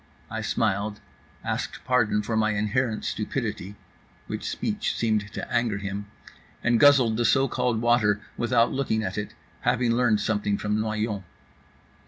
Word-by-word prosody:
I 110 - -3
smiled, 105 -1 -1 0.4
asked - - -3
pardon 110 -4 +2
for 110 +2 -2
my 110 0 +2
inherent 110 +2 0
stupidity 100 +3 -3 0.5
(which - - -4
speech - - -2
seemed 110 -2 0
to - - -6
anger 115 -4 +1
him) 100 0 -5 0.6
and 115 -1 +3
guzzled 130 -6 +6
the 120 - +1
so 135 +4 +4
called 120 -3 0
water 115 -4 +3 0.2
without 120 0 +2
looking 120 -5 0
at 110 - -2
it, 105 - -6 0.2
having 120 -1 +1
learned 115 -3 +3
something 105 -1 0
from 105 0 -1
Noyon. 110 -2 -2
110 Hz, 145 wpm, -26 LUFS, 105-120 Hz, 0.6 s, guzzled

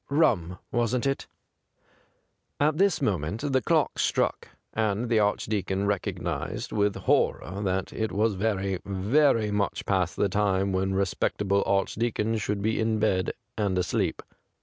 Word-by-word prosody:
Rum, 105 - +2
wasn't 120 +2 0
it 135 0 -1 0.7
?' - - -40
At 155 +2 -4
this 195 -7 +3
moment 95 - -1
the 130 - +3
clock 160 -3 +1
struck, - - 0 0.3
and 110 +1 0
the 110 - +4
Archdeacon 100 -2 0
recognised 100 -2 -3
with 105 -1 +1
horror 95 +7 0
that 95 -1 -1
it 110 -1 -2
was 110 +2 +1
very, 95 -2 -1
very 105 +3 +2
much 105 -1 -1
past 90 -3 0
the 100 - +2
time 100 0 +1
when 95 +1 0
respectable 100 +1 0
Archdeacons 110 +2 0
should 100 0 -2
be 110 +1 +1
in 110 0 +1
bed 95 -4 +1 0.2
and 100 -3 0
asleep. 90 -1 -1
105 Hz, 140 wpm, -27 LUFS, 95-110 Hz, 0.7 s, the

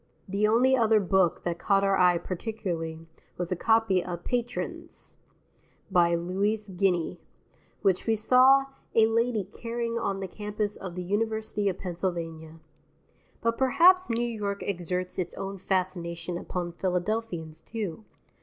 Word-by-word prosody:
The 200 +2 +1
only 250 +4 +4
other 225 -3 +4
book 190 -3 +2
that 170 -1 -2
caught 195 -1 +2
our 195 0 +3
eye 180 -2 +5
particularly 170 -4 -4 0.3
was 175 0 -3
a - - +2
copy 225 -2 +3
of 175 -1 -6
"Patrins," 245 -1 -4 0.8
by 170 -1 +4
Louise 200 +5 -1
Guiney, 180 -2 0 0.6
which 190 0 +2
we 225 - +3
saw 260 +5 +5 0.3
a 225 - +7
lady 230 -1 +1
carrying 230 +3 -4
on 195 -3 -2
the 195 - -4
campus 210 +1 -3
of 185 -3 -7
the 180 - -4
University 215 +1 -1
of 185 - -4
Pennsylvania. 165 -3 -4 0.8
But 230 0 0
perhaps 340 +8 +5
New 235 +1 0
York 205 -3 -3
exerts 180 -1 -3
its 180 - -3
own 195 0 -5
fascination 180 -2 -2
upon 175 0 -4
Philadelphians, 180 -3 -2
too. 215 -4 -5
195 Hz, 135 wpm, -28 LUFS, 175-225 Hz, 0.8 s, a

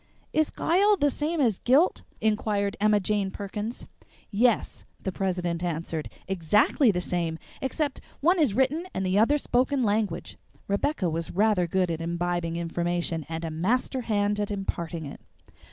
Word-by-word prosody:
"Is 310 -1 +2
'guile' 400 +5 +3
the 290 -4 +2
same 310 +4 -1
as 230 -9 +2
'guilt?" 280 +9 +3 0.2
inquired 210 -2 +1
Emma 210 0 +4
Jane 200 0 0
Perkins. 205 +4 -5 0.5
"Yes," 230 +2 +1 0.2
the 190 - -3
president 180 -2 -2
answered; 165 -2 -3 0.2
"exactly 195 - +3
the 180 -4 +2
same, 170 -2 -2 0.2
except 285 +1 -2 0.2
one 350 +5 +3
is 270 -11 +3
written 290 +7 +1
and 190 - -1
the 185 +2 +2
other 275 +7 +4
spoken 260 0 +1
language." 210 -1 -1 0.3
(Rebecca 200 +1 0
was 165 0 -2
rather 200 -3 +2
good 180 0 +1
at 165 0 -3
imbibing 170 0 -1
information, 170 -1 -2
and 165 +1 -4
a 160 - -3
master 235 - 0
hand 205 -2 0
at 205 - -1
imparting 170 -5 -3
it!) 140 - -9
200 Hz, 155 wpm, -27 LUFS, 175-250 Hz, 0.5 s, Emma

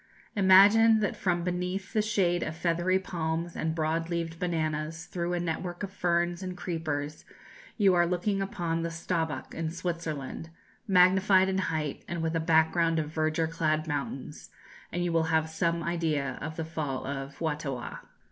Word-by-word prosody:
Imagine 205 +3 +7
that 205 - 0
from 175 -3 0
beneath 180 +2 -3
the 215 - +3
shade 190 -5 +1
of 155 - -3
feathery 175 +2 +1
palms 170 -2 -3
and 160 0 -1
broad 165 +1 -1
leaved 165 -1 -3
bananas 160 -2 -2
through 175 0 -3
a 175 - 0
network 175 +2 -3
of 195 - -4
ferns 175 -1 0
and 185 -1 -5
creepers 155 -4 -3 0.5
you 200 -4 +5
are 175 -1 +4
looking 190 +3 0
upon 170 -4 -2
the 170 - -2
Staubbach, 165 -4 -3
in 165 -1 -2
Switzerland, 165 -3 -4 0.4
magnified 190 0 +5
in 190 0 0
height, 155 -5 -2
and 170 -1 -3
with 165 0 -1
a - - +2
background 165 0 +3
of 155 -1 -2
verdure 155 +1 +1
clad 155 -1 0
mountains, 145 -1 -4 0.4
and 175 +1 -1
you 175 - 0
will 165 -1 +3
have 160 0 +1
some 170 +1 0
idea 155 -6 -1
of 155 +1 -5
the 160 - -3
fall 150 -5 -3
of 135 0 -5
Fuatawah." 150 -6 -3
165 Hz, 165 wpm, -29 LUFS, 160-180 Hz, 0.5 s, Imagine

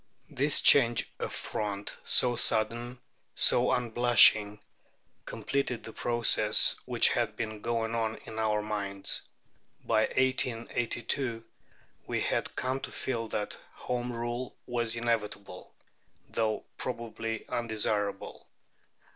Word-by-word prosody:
This 145 +1 +1
change 120 -5 +5
of - - -4
front, 100 -1 -4
so 120 -1 +4
sudden, 120 +3 0 0.4
so - - +4
unblushing, 115 -3 +4 0.7
completed 135 -4 -3
the 110 - -9
process 120 -1 +4
which - - +5
had - - -1
been 110 -2 -5
going 115 0 -2
on 110 -1 -1
in 110 - -7
our 105 -1 0
minds. 100 -2 -3 0.6
By 110 0 +2
1882 120 -1 -1 0.6
we - - -1
had - - -2
come 130 +1 -2
to - - -7
feel 115 -3 -3
that 105 -1 -4 0.2
Home 125 0 -4
Rule 120 +1 -5
was 120 -2 -2
inevitable, 105 -5 -3 0.6
though 110 -1 -1 0.2
probably 115 -2 -5
undesirable. 105 -3 -3
115 Hz, 105 wpm, -29 LUFS, 110-120 Hz, 0.7 s, change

